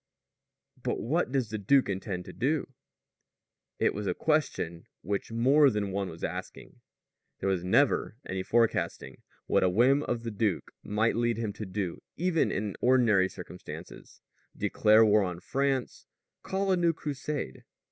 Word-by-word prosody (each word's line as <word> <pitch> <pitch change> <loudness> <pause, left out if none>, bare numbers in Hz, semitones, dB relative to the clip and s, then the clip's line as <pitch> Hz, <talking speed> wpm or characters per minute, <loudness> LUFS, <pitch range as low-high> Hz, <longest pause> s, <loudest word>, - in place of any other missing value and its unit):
"But - - -2
what 150 +6 0
does 130 -6 -1
the 110 - -3
duke 130 +7 +3
intend 95 -2 -4
to - - -9
do?" 140 +1 -1 1.0
It - - +2
was 105 0 -4
a - - 0
question 130 - -1 0.2
which 100 +4 -3
more 135 +6 +5
than 105 -4 -2
one 95 -1 -2
was 80 - -10
asking. - - -6 0.6
There 95 - -1
was 95 -3 0
never 115 +3 +2
any 95 0 -3
forecasting 115 +4 0 0.2
what - - +2
a 95 - +3
whim 125 +9 +4
of 120 -4 -3
the 115 - -4
duke 105 -3 -1
might 110 +2 0
lead 120 -1 +1
him 110 -3 -2
to 105 0 -7
do 95 -2 -4 0.2
even 170 -1 +1
in 100 -1 -2
ordinary 115 -7 +4
circumstances 90 0 -10 0.4
declare 110 +1 +4
war 105 0 +5
on 90 -3 -3
France, 135 +3 -2 0.3
call 195 0 -1
a 185 - +3
new 170 -1 +3
Crusade. 145 - -5
110 Hz, 155 wpm, -29 LUFS, 95-135 Hz, 1.0 s, more